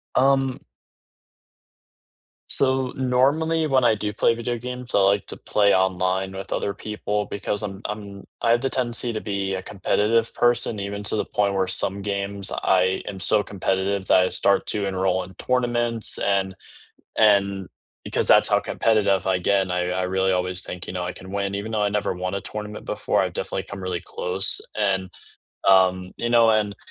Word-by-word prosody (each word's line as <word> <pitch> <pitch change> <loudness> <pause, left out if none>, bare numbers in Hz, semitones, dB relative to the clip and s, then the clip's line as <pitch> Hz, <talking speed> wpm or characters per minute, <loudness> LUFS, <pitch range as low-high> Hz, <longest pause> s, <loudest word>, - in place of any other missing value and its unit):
Um 135 -1 +2 1.9
So, 130 -1 +1
normally 140 +6 +2
when 130 -3 +3
I 115 -2 +4
do 105 0 -3
play 115 +2 +2
video 120 +1 -3
games, 125 +1 -7
I - - +4
like 100 +1 +3
to - - -7
play 100 -1 +2
online 95 0 +1
with 95 0 -7
other 100 - -1
people 105 0 -3
because 105 +1 -3
I'm 95 -1 -5
I'm 100 -2 -6 0.2
I 115 - +3
have 120 0 +3
the 135 - 0
tendency 120 -2 -1
to 110 - -3
be 100 -2 -2
a 95 - -3
competitive 110 +4 0
person, 120 -2 +1
even 100 +1 -4
to 105 - 0
the 105 - -1
point 100 -1 0
where 95 -1 +1
some 95 +1 0
games 100 -1 -3
I 95 0 +1
am 95 - -6
so 105 +3 +3
competitive 95 0 -1
that - - +5
I - - -1
start 100 - +1
to 105 -1 0
enroll 95 -1 0
in 95 - -12
tournaments, 120 -2 0
and 95 -1 0 0.6
and 100 -3 +3 0.4
because - - -1
that's - - +5
how - - +3
competitive 100 -4 +1
I 95 -1 +2
get, 95 +2 +2
and 95 -1 -4
I 90 0 0
I 95 +1 -1
really 95 +1 +1
always 90 0 -1
think, 90 0 -7
you - - -6
know, 90 -1 -3
I 90 +1 -3
can 95 +1 -11
win. 100 -1 -2
Even 110 +3 -5
though 105 -1 0
I 105 - +2
never 100 -2 -1
won 90 +2 -3
a 100 - -2
tournament 105 +2 -7
before, - - 0
I've - - -2
definitely - - -3
come 100 -1 -8
really 90 -2 -2
close 95 +2 -2 0.2
and, 95 -3 0 0.6
um, 95 -1 +4
you 120 - -2
know, 115 -1 +6
and 105 -2 +1
100 Hz, 185 wpm, -23 LUFS, 95-115 Hz, 1.9 s, know